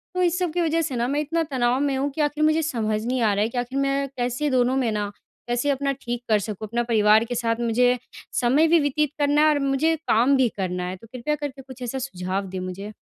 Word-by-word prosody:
तो 365 - +1
इस 355 0 +2
सब 360 -3 0
की 350 - 0
वज़ह 330 0 +1
से 285 -5 -3
ना 240 0 0
मैं 285 +3 0
इतना 330 +2 -1
तनाव 250 -1 +1
में 280 -1 +1
हूँ 275 +2 0
कि 305 - -3
आख़िर 295 +1 0
मुझे 310 +1 +3
समझ 220 -8 -1
नहीं 250 0 0
आ 215 -3 +3
रहा 200 - 0
है 225 - 0
कि 250 - -7
आख़िर 245 +3 -2
मैं 275 0 0
कैसे 250 +4 -1
दोनों 255 0 +2
में 245 -4 +1
ना 205 -1 -2 0.4
कैसे 240 +4 0
अपना 280 0 0
ठीक 240 0 -4
कर 215 -1 +4
सकूँ, 215 +1 -5
अपना 235 +3 -1
परिवार 220 -2 +4
के 245 +1 -4
साथ 230 -1 0
मुझे 245 +2 +3 0.4
समय 270 +7 +4
भी 335 +1 +5
व्यतीत 295 0 +1
करना 290 +1 +3
है 310 - +6
और 295 - +2
मुझे 275 +4 +1
काम 245 +5 +4
भी 255 -3 +3
करना 180 -2 -2
है, 180 +1 -4
तो 210 +5 -15
कृपया 255 +4 -2
करके 280 -2 -6
कुछ 260 -1 -13
ऐसा 250 +2 -3
सुझाव 190 -6 -3
दें 190 0 -5
मुझे? 185 +3 -6
255 Hz, 260 wpm, -24 LUFS, 225-290 Hz, 0.4 s, है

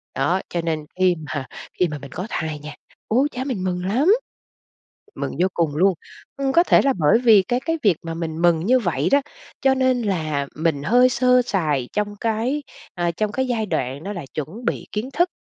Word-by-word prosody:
đó. 185 +2 +1
Cho 170 - -2
nên 160 -2 -2
khi 185 -1 +4 0.2
mà 140 -3 -3 0.3
khi 180 - +4
mà 150 - -5
mình 140 -1 -11
có 185 +6 -5
thai 155 -1 -3
nha, 150 +1 -9 0.3
ôi 260 +6 +3
cha, 255 +1 -4
mình 240 -9 -3
mừng 180 -1 -2
lắm, 250 - +1 1.1
mừng - - -3
vô 185 - +4
cùng 160 -4 0
luôn! 185 +4 +4 0.4
Ừ, 270 -1 0
có 340 - +7
thể - - +5
là 275 -1 +3
bởi 160 +8 +4
vì 225 -5 +6
cái 245 +3 0
cái 325 +3 -1
việc 195 -6 +4
mà 165 -1 -4
mình 165 0 -4
mừng 170 -2 +4
như 250 +9 +3
vậy 175 -7 0
đó, 280 0 +5 0.4
cho 270 -1 +4
nên 260 -2 +2
là 155 -9 -1
mình 155 -2 0
hơi 245 +8 +5
sơ 250 0 +4
sài 150 - -1
trong 205 0 -1
cái, 230 +7 -1 0.3
à, 175 -1 0
trong 210 +5 -2
cái 260 +3 -1
giai 230 -3 -1
đoạn 140 -5 -3
nó 205 - -4
là 175 -7 -6
chuẩn 170 - -6
bị - - -2
kiến 220 +5 -3
thức. 350 +5 +2
190 Hz, 215 wpm, -22 LUFS, 160-250 Hz, 1.1 s, có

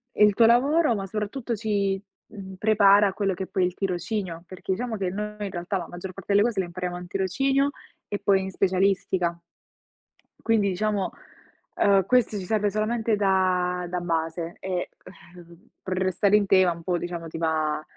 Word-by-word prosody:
il 210 -1 +5
tuo 230 - +5
lavoro, 275 +5 +4
ma 195 -1 -3
soprattutto 220 +4 -3
ci, 200 -3 0 0.3
mhmm, 190 -3 -10
prepara 205 0 +5
a 190 - -2
quello 195 -2 0
che 190 +1 -5
poi 185 - 0
è - - +4
il 180 - -2
tirocinio, 185 -2 -3
perché 185 +1 -4
diciamo 235 +2 -3
che 190 -2 -1
noi 210 +2 -4
in 205 -1 -3
realtà 175 +3 -3
la 175 - -5
maggior 180 +1 -8
parte 195 +1 -4
delle 205 +2 +5
cose 225 -5 -1
le 190 - 0
impariamo 180 0 -4
al 180 0 -7
tirocinio 270 +10 +1 0.4
e 205 - -3
poi 195 -1 +3
in 190 0 -5
specialistica. 185 -2 +1 1.1
Quindi 220 -3 +2
diciamo, 200 +1 -1 0.6
uhm, 195 -2 +3
questo 245 -3 +2
ci 190 - -5
serve 210 0 +1
solamente 220 +2 0
da 185 -2 +1
da 180 0 -2
base 165 0 -3
e, 185 -2 -3 0.5
uhm, 170 0 -16
per 190 - -4
restare 190 +2 +2
in 210 -1 +4
tema 190 -2 +5
un 165 - -12
po', 180 0 0
diciamo, 170 -1 -5
ti 160 - -7
va 155 -2 0
195 Hz, 185 wpm, -25 LUFS, 180-210 Hz, 1.1 s, il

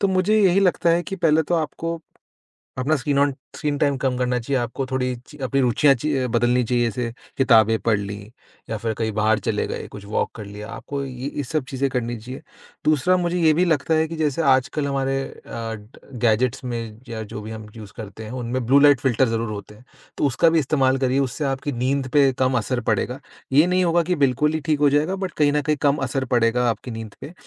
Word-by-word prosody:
तो 200 - +2
मुझे 190 +3 +2
यही 195 0 +4
लगता 180 -2 +2
है 170 +1 +2
कि 195 - -6
पहले 160 -2 +3
तो 175 - -1
आपको 165 +1 -2 0.8
अपना 150 +5 +2
स्क्रीन 140 +1 0
ऑन 140 -1 +3 0.2
स्क्रीन 145 -2 -2
टाइम 140 -3 +2
कम 130 -1 -1
करना 125 0 0
चाहिए। 130 +2 -1
आपको 125 +3 -3
थोड़ी 130 -1 -1
च 150 - -14
अपनी 135 +2 0
रुचियाँ 130 +3 +4
च 120 - -7 0.3
बदलनी 120 +1 +2
चाहिए 120 +1 +1
जैसे 115 +1 -3 0.2
किताबें 115 -4 +5
पढ़ 110 -3 +1
लीं 100 +1 -7 0.4
या 110 - -2
फिर 110 +1 -2
कहीं 110 0 -2
बाहर 110 +1 +2
चले - - -1
गए, - - -5
कुछ 100 -1 -10
वॉक 105 - -1
कर 110 -3 -7
लिया, 105 +2 -9
आपको 140 +5 -5
ये 130 +2 -5
सब 155 +2 -2
चीज़ें 135 0 -1
करनी 120 -2 -2
चाहिए। 125 +6 -9 0.4
दूसरा 155 +4 +3
मुझे 175 0 -1
ये 160 -1 +5
भी 180 +3 +2
लगता 160 -1 +1
है 160 0 +2
कि 165 - -5
जैसे 155 0 0
आजकल 135 +2 +2
हमारे 135 -1 0
अ, 115 -3 -7 0.5
गैजेट्स 120 +3 +2
में 115 -3 -5
या 110 -1 -5
जो 105 0 -7
भी 110 - -8
हम 110 -1 -8
यूज़ 105 -2 -10
करते 110 0 -8
हैं 110 - -8
उनमें 120 +1 -2
ब्लू 140 +2 +6
लाइट 145 -2 +6
फिल्टर 130 -1 +2
ज़रूर 115 -1 -2
होते 105 0 -8
हैं, 125 +4 -19 0.3
तो - - +1
उसका 150 +6 +3
भी 165 0 +3
इस्तेमाल 135 -2 +2
करिए, 130 +1 +1
उससे 140 +2 -1
आपकी 135 +1 -2
नींद 135 0 0
पे 140 -2 +5
कम 130 -1 +2
असर 120 +3 -2
पड़ेगा। 125 +5 -1 0.3
ये 150 +5 +6
नहीं 185 0 +2
होगा 170 0 +3
कि 180 +2 0
बिल्कुल 150 +4 +1
ही 160 - 0
ठीक 150 -2 +1
हो 145 -1 +5
जाएगा 150 +7 +1
बट 190 -1 -4
कहीं 145 -1 +4
न 150 - +2
कहीं 150 0 0
कम 145 0 +3
असर 135 -1 -1
पड़ेगा 120 +1 +2
आपकी 115 +3 -4
नींद 110 -2 -7
पे। 165 - -8
130 Hz, 225 wpm, -22 LUFS, 115-150 Hz, 0.8 s, ब्लू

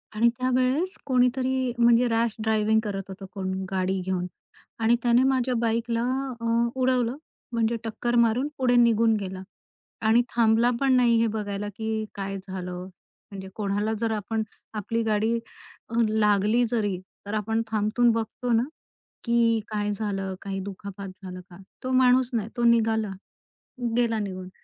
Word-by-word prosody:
आणि 235 +2 +4
त्यावेळेस 255 +8 +1
कोणीतरी, 255 0 +1
म्हणजे 235 +1 +5
रॅश 230 -1 +1
ड्रायव्हिंग 220 0 +2
करत 195 -3 -3
होतं 195 +1 -8
कोण 190 -2 -3 0.2
गाडी 190 0 0
घेऊन 185 -1 -1 0.5
आणि 225 +1 +4
त्याने 240 +1 +4
माझ्या 260 -1 +1
बाईकला 230 0 0 0.4
अ, - - -3 0.3
उडवलं, 255 -2 +1 0.4
म्हणजे 230 0 +1
टक्कर 230 +2 -2
मारून 235 +4 +2
पुढे 250 -2 +2
निघून 230 -2 +4
गेला. 190 -1 -5 0.6
आणि 225 +2 +4
थांबला 230 +1 +4
पण 270 -1 +4
नाही, 240 -2 +4
हे 230 - +3
बघायला, 205 -1 -3
की 220 0 -2
काय 195 -1 -4
झालं. 180 -1 -5 0.4
म्हणजे 190 -1 -7
कोणाला 205 +1 -1
जर 230 -1 +1
आपण 220 +1 -2 0.3
आपली 230 +3 -1
गाडी 220 +1 +1 0.7
लागली 210 +2 +3
जरी, 205 -6 0 0.3
तर 205 - -5
आपण 220 +1 0
थांबून 220 +3 +3
बघतो 230 +2 -2
ना, 230 +1 +4 0.6
की 235 -1 +3
काय 210 -1 -1
झालं 195 -2 -3
काही 195 -1 -4
दुखापत 200 0 -7
झालं 185 -1 -7
का? 175 - -13 0.3
तो 255 - -2
माणूस 255 -1 +4
नाही 220 -2 -1
तो 240 - 0
निघाला, 225 -3 +3 0.9
गेला 230 -2 +2
निघून. 185 -3 -5
225 Hz, 145 wpm, -26 LUFS, 205-240 Hz, 0.9 s, म्हणजे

